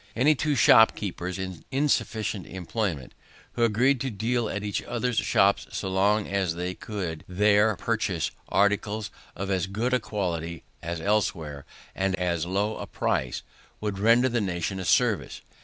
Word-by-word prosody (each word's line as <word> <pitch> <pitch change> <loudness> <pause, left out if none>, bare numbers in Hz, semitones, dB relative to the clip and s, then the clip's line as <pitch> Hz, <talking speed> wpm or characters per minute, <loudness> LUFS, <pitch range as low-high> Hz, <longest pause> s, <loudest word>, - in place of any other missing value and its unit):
Any 135 +7 +4
two 150 -1 0
shopkeepers, 100 -6 +4
in 95 -4 -6
insufficient 115 - 0
employment, 90 - -3 0.4
who 120 - 0
agreed 120 +4 +3
to 135 - -1
deal 115 +1 -1
at 105 - -3
each 105 -1 -2
other's 120 -1 -2
shops 100 +1 +2
so 95 - -4
long 100 +2 +2
as 95 -4 0
they 90 +1 -3
could 90 -6 -5
there 105 +3 +3
purchase 105 -6 -1 0.2
articles 105 +1 +1 0.2
of 95 +2 -3
as 95 -1 0
good 110 +6 -1
a 125 - +4
quality 85 -7 -3 0.2
as 85 0 -4
elsewhere, 80 -7 -1 0.3
and 95 0 0
at - - -13
as 85 -2 0
low 100 +4 0
a - - -6
price, 65 -2 -1 0.4
would 105 -2 -3
render 115 +4 +5
the 120 -2 0
nation 95 0 -2
a 95 - -4
service. - - +1
100 Hz, 155 wpm, -26 LUFS, 90-110 Hz, 0.4 s, render